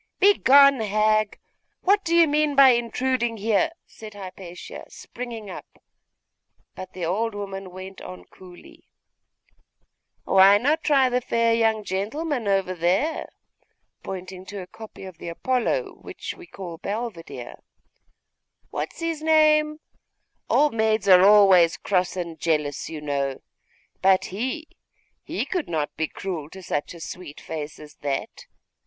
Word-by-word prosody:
'Begone, 280 -9 +6
hag! 215 0 +1 0.4
What 400 +2 +3
do 335 0 0
you 335 -1 +6
mean 300 0 +1
by 275 -1 +8
intruding 240 0 0
here?' 220 +8 +1 0.2
said 215 -2 -12
Hypatia, 185 -2 -9
springing 235 -3 -8
up; - - -10 0.9
but 185 0 -9
the 180 -2 -4
old 210 +6 -1
woman 195 -2 -6
went 185 +1 -10
on 90 -1 -10
coolly 180 - -16 1.4
'Why 195 +1 +6
not 295 +8 +1
try 275 -4 +4
the 250 0 0
fair 230 -1 +1
young 225 -2 +2
gentleman 225 - -3
over 195 -2 +1
there?' 185 - 0 0.7
pointing 185 0 -7
to 200 -1 -6
a - - -10
copy 220 +1 -12
of 185 -3 -10
the - - -8
Apollo 255 - -1
which - - -7
we 355 -1 -14
call 175 - -8
Belvedere 205 -5 -6 1.1
'What - - -3
is - - -13
his 330 -2 -2
name? 305 -1 +3 0.7
Old 300 -2 +3
maids 220 -2 +1
are 185 -2 +8
always 195 -4 +6
cross 185 -1 -1
and 170 -2 -5
jealous, 150 -3 -1
you 155 -2 -7
know. 140 -2 -2 0.6
But 190 0 +4
he 260 - -3 0.5
he - - -3
could 360 -5 -3
not 155 -3 -2
be 160 0 -1
cruel 165 -6 -6
to 190 +2 -11
such 150 0 -3
a - - -11
sweet 165 -2 -8
face 155 -2 -6
as 150 -1 -14
that. 140 -1 -4
205 Hz, 140 wpm, -24 LUFS, 180-255 Hz, 1.4 s, by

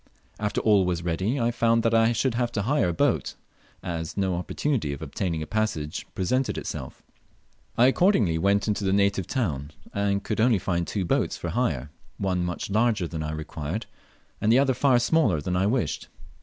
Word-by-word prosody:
After 105 0 -1
all 105 -3 +4
was 90 -2 -1
ready 95 +10 -1
I 120 0 +1
found 115 -1 +2
that 115 -1 +2
I 115 0 +4
should 120 +2 0
have 120 0 0
to 100 - -1
hire 135 -5 +2
a - - -1
boat, - - 0 0.5
as 80 -1 -4
no 95 -2 +1
opportunity 90 - -1
of 70 - -8
obtaining 80 +1 -2
a - - -5
passage 80 -7 -2
presented 130 +8 0
itself. - - -6 0.7
I 120 - +6
accordingly 130 - +3
went 100 +4 +2
into 105 -1 0
the 95 0 +1
native 100 -2 +2
town, 75 - -2 0.2
and 100 -1 0
could 110 0 -1
only 115 -2 +4
find 85 -2 -1
two 100 -3 -2
boats - - 0
for - - -4
hire, 70 +4 -1 0.3
one 90 -2 0
much 90 +2 -4
larger 110 -4 +2
than 80 -1 -5
I 75 0 -3
required, 80 +5 -4 0.6
and 105 - +3
the 120 - +6
other 135 -1 +3
far 130 0 +3
smaller 120 - +2
than 90 +5 -2
I 95 +2 +2
wished. 120 +2 -1
100 Hz, 190 wpm, -26 LUFS, 85-115 Hz, 0.7 s, I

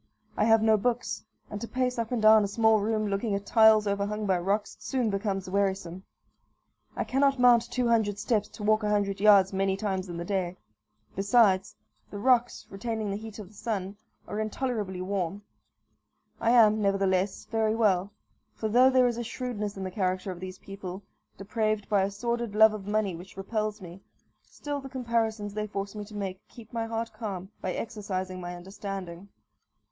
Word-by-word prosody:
I 210 - +2
have 225 -1 +5
no 220 -1 +5
books; 245 +3 -1 0.3
and 210 - -5
to 235 - -4
pace 250 -1 -1
up 230 0 -2
and 245 - 0
down 215 0 +7
a - - 0
small 220 +1 +3
room, 215 +1 0
looking 200 +1 -1
at 200 0 -4
tiles 220 -2 +6
overhung 205 +1 -1
by 190 -3 +2
rocks, 200 +4 -1
soon 250 -5 -1
becomes 195 -1 -2
wearisome. 190 -2 -1 0.9
I - - -1
cannot 270 +4 +2
mount 240 -1 +5
two 245 0 0
hundred 220 -3 +2
steps 210 -1 0
to 210 - -10
walk 215 +1 +3
a 210 - -1
hundred 200 -2 0
yards 200 -2 +6
many 195 0 +1
times 195 -2 -2
in 170 - -5
the 170 - -4
day. 185 -2 -2 0.6
Besides, 195 -2 +3 0.3
the 205 - -7
rocks, 245 +2 +2
retaining 215 +1 -3
the - - -2
heat 220 0 -8
of 205 -4 -9
the - - -20
sun, 200 -3 -4 0.3
are 210 - -4
intolerably 215 -4 -2
warm. 195 +1 -3 1.0
I 230 - +1
am, 220 -3 +5
nevertheless, 195 -1 +1
very 220 -1 0
well; 200 -4 +2 0.4
for 220 - -2
though 250 +4 +6
there 255 -1 +4
is 240 -1 0
a 240 - -2
shrewdness 220 -4 -4
in 190 - -4
the 185 - -4
character 185 0 -1
of 180 - -8
these 185 0 -7
people, 195 -1 -8 0.3
depraved 215 0 -1
by 205 -2 +3
a 195 - +1
sordid 235 +1 -3
love 220 0 +7
of 205 -2 -7
money 205 -3 0
which 185 +4 -12
repels 215 +1 -3
me, 180 +1 -10 0.4
still 290 -1 -6
the 270 - -9
comparisons 230 -5 -1
they 215 0 -3
force 200 -1 -4
me 210 -1 -6
to 210 +1 -12
make 190 -2 -4
keep 230 -1 -14
my 230 -1 -2
heart 225 0 -3
calm 195 -4 -6
by 185 - -2
exercising 185 -4 -4
my 175 0 -6
understanding. 190 0 -7
210 Hz, 185 wpm, -28 LUFS, 195-225 Hz, 1.0 s, down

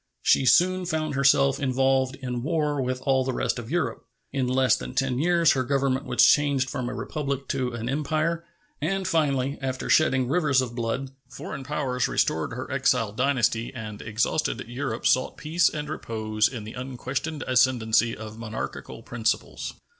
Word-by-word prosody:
She 130 - +4
soon 185 +5 +4
found 155 -3 -1
herself 140 0 +3
involved 135 -1 +1
in 125 -3 -4
war 150 -1 0
with 130 0 -3
all 135 -1 +2
the 130 0 -2
rest 125 - -1
of 115 -1 -8
Europe. 145 -8 -1 0.3
In 135 -3 0
less 130 -2 +3
than - - -7
ten 130 -2 0
years 170 +1 +4
her 130 - +1
Government 135 +1 0
was - - +5
changed 140 -3 +3
from 125 -1 -3
a - - -5
republic 140 -3 -3
to 130 -3 -1
an 115 0 -4
empire, 155 +4 -1 0.4
and 190 +4 -1
finally, 140 -5 +1
after 130 -1 -2
shedding 130 -5 +3
rivers 145 -2 +2
of 125 -2 -2
blood, 120 +3 -3 0.2
foreign 135 +3 -7
powers 130 -3 -1
restored 80 +6 0
her 125 +3 -6
exiled 125 -5 +1
dynasty 120 -3 +1
and 105 -3 -7
exhausted 115 +4 -1
Europe 135 +4 -4
sought 130 - +2
peace 165 +4 +2
and 150 -1 -5
repose 110 -7 -1
in 120 -5 -6
the 110 - -8
unquestioned 130 +4 -4
ascendency 120 -3 +2
of 110 +1 -9
monarchical 110 -1 -6
principles. 115 -1 -2
130 Hz, 165 wpm, -25 LUFS, 120-145 Hz, 0.4 s, was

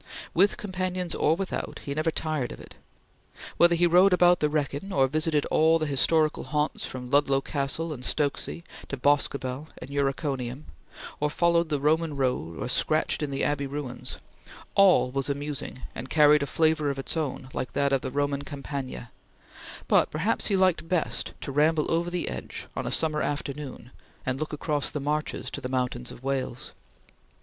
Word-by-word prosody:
With 195 +4 +3
companions 185 -4 -3
or 155 - +2
without, 190 +1 -4
he 140 - -2
never 155 +3 0
tired 155 -5 -2
of - - -9
it. - - -11 0.8
Whether 170 0 +6
he 175 +1 +3
rode 180 +3 +6
about 175 0 +5
the 150 - +2
Wrekin, 150 +5 -2
or 135 -6 +4
visited 155 +1 +1
all 160 +1 +5
the 155 - -1
historical 155 +2 +2
haunts 150 0 -1
from 125 -1 -7
Ludlow 140 -1 +4
Castle 145 +3 -2
and 125 -3 -9
Stokesay 145 +4 -1 0.2
to 140 - -4
Boscobel 140 0 +1
and 140 - -9
Uriconium; 135 -1 -2 0.5
or 150 - +1
followed 170 +1 +2
the 145 -2 0
Roman 155 +2 +1
road 125 - -1
or - - -3
scratched 155 +6 +1
in 150 - -1
the 135 - -2
Abbey 145 -1 0
ruins, 135 -3 -5 0.6
all 190 -10 +5
was 135 +1 -1
amusing 140 -2 -4
and 130 +3 -7
carried 150 -1 +6
a 140 - -1
flavor 155 0 +2
of 140 - -2
its 135 - -2
own 140 -4 -3
like 125 -2 -4
that 140 0 +1
of 135 - +2
the - - -3
Roman 140 +1 -1
Campagna; 140 -4 -6 0.8
but - - +4
perhaps 185 +9 0
he 200 - +2
liked 185 -3 +2
best 180 -3 -1
to 140 - -4
ramble 150 +2 +2
over 170 +1 +1
the 175 0 -2
Edge - - -6
on - - -3
a - - -2
summer 155 -2 +1
afternoon 140 -3 -4 0.3
and 130 +1 -1
look 155 - -3
across 150 -1 -1
the 150 - -3
Marches 150 +2 -2
to - - -5
the 125 - -4
mountains 125 -1 -2
of 120 - -12
Wales. 135 -2 -3
145 Hz, 175 wpm, -27 LUFS, 135-160 Hz, 0.8 s, Whether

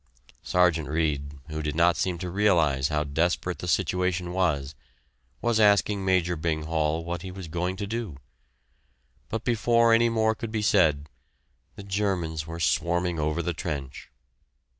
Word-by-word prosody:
Sergeant 85 -4 +2
Reid, 75 -2 -1 0.2
who 80 0 -4
did 75 -1 -3
not 85 +1 +4
seem 90 -2 -1
to 90 0 -5
realize 85 -9 +2
how 75 -1 0
desperate 85 +4 -1
the 90 - -5
situation 90 0 0
was, 75 -7 0 0.7
was 120 -2 +2
asking 105 -1 +3
Major 90 -2 +1
Bing 80 -1 -2
Hall 80 0 -1
what 85 0 -4
he 95 - -7
was 90 -1 -8
going 90 +3 -2
to 100 +1 -4
do. 110 - -4 1.1
But 115 - -3
before 115 0 +3
any 115 +1 +4
more 110 -1 +2
could 110 0 -6
be 110 -1 -2
said, 80 -8 +3 0.7
the 100 - -9
Germans 95 -6 -2
were 85 +1 -6
swarming 85 +1 0
over 75 +3 -1
the 90 - -1
trench. 70 -5 -6
85 Hz, 155 wpm, -26 LUFS, 80-100 Hz, 1.1 s, not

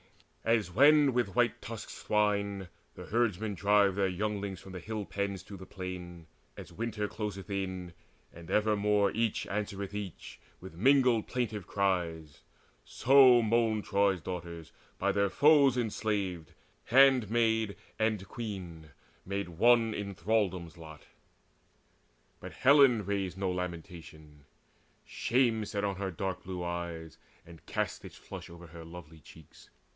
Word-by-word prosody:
As 110 -5 +1
when 145 - +5
with 115 -5 -1
white 120 -1 +1
tusked 115 -2 -7
swine 100 -2 -1 0.3
the - - -9
herdmen 110 -2 0
drive 100 +1 +3
Their 95 0 +1
younglings 100 0 -3
from 95 - -12
the 90 - -7
hill 105 +3 -5
pens 100 -2 -3
to 100 +1 -10
the 95 -1 -11
plain 90 -3 -8 0.3
As - - -10
winter 110 -2 -3
closeth 100 -3 -6
in, 95 -3 -4 0.4
and 85 -1 -12
evermore 105 -1 +2
Each 115 -1 -1
answereth 100 -1 -4
each 100 -4 -7 0.2
with 95 0 -11
mingled 125 +3 +3
plaintive 110 -6 -3
cries; 85 -7 -2 0.4
So 130 - +5
moaned 110 -1 +1
Troy's 100 -2 +2
daughters 85 -2 -7 0.3
by - - +1
their 100 -1 +1
foes 140 0 +5
enslaved, 100 - -2 0.3
Handmaid 115 -4 +3 0.2
and 110 -3 0
queen 90 -9 -7 0.3
made 100 -1 -4
one 115 +5 +3
in 100 -2 -5
thraldom's 95 -3 -1
lot. 80 -2 -12 1.4
But - - -9
Helen 130 -6 +5
raised 95 -2 -2
no 95 -1 -1
lamentation: 85 -5 -8 0.6
shame 120 -3 +1
Sat 105 -1 -4
on 100 -2 -1
her 95 -1 -3
dark 95 +1 -4
blue 90 -1 -5
eyes, 85 -2 -5 0.3
and 85 -2 -14
cast - - -3
its - - -11
flush - - -10
Over 85 +1 -12
her 85 0 -11
lovely 80 -1 -12
cheeks. 80 +1 -17
100 Hz, 135 wpm, -30 LUFS, 90-110 Hz, 1.4 s, when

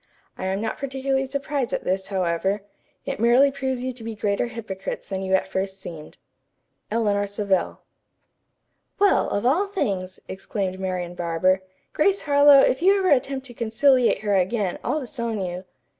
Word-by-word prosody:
I - - -5
am 190 +2 -1
not 225 - -3
particularly 270 0 -1
surprised 280 -2 -2
at - - -2
this, 190 +1 -1
however. 190 +1 -1 0.4
It - - -4
merely 245 +5 +5
proves 265 -2 -3
you 255 0 -2
to 240 -2 -10
be 225 0 -5
greater 205 +2 0
hypocrites 215 -5 -6
than 190 -1 -3
you 190 0 +1
at 190 - 0
first 190 0 -3
seemed. 160 -5 -9 0.7
"ELEANOR 205 -3 +1
SAVELL." 200 -2 -1 1.2
"Well, 405 0 +3
of 205 - -1
all 335 +11 +3
things!" 195 - -3
exclaimed 190 0 -4
Marian 180 -2 -3
Barber. 175 +2 +1 0.3
"Grace 395 +5 +2
Harlowe, 285 -1 +7
if 265 - +2
you 390 +3 +5
ever 380 -1 +1
attempt 270 0 +1
to 245 - -8
conciliate 240 +3 +3
her 205 -2 +1
again, 190 0 0
I'll 305 - 0
disown 235 -4 -4
you." 180 0 -4
220 Hz, 160 wpm, -24 LUFS, 190-270 Hz, 1.2 s, Harlowe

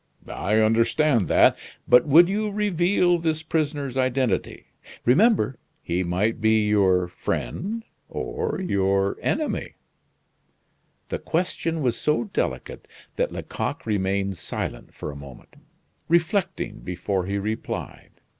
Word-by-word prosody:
"I 105 +3 -1
understand 115 +3 +3
that; - - +5 0.3
but 125 +3 +6
would 165 +5 +7
you 210 +3 -1
reveal 180 -3 +2
this 160 -1 -1
prisoner's 145 -5 -2
identity 130 -4 0 0.4
remember, 145 - +3 0.2
he 85 +2 -1
might 95 +6 0
be 110 -1 +3
your 95 -4 +3
friend 195 - -3 0.3
or 455 - -3
your 100 - +1
enemy?" 305 0 -2 1.3
The - - -3
question 165 -2 -1
was 120 -2 0
so 150 -6 +1
delicate 65 - -4 0.3
that - - 0
Lecoq - - -4
remained 100 -3 -1
silent - - -5
for - - -5
a - - -10
moment, 70 -3 -12 0.5
reflecting 170 - 0
before 90 +1 -3
he 100 +1 -1
replied. 110 +2 -5
120 Hz, 115 wpm, -24 LUFS, -, 1.3 s, would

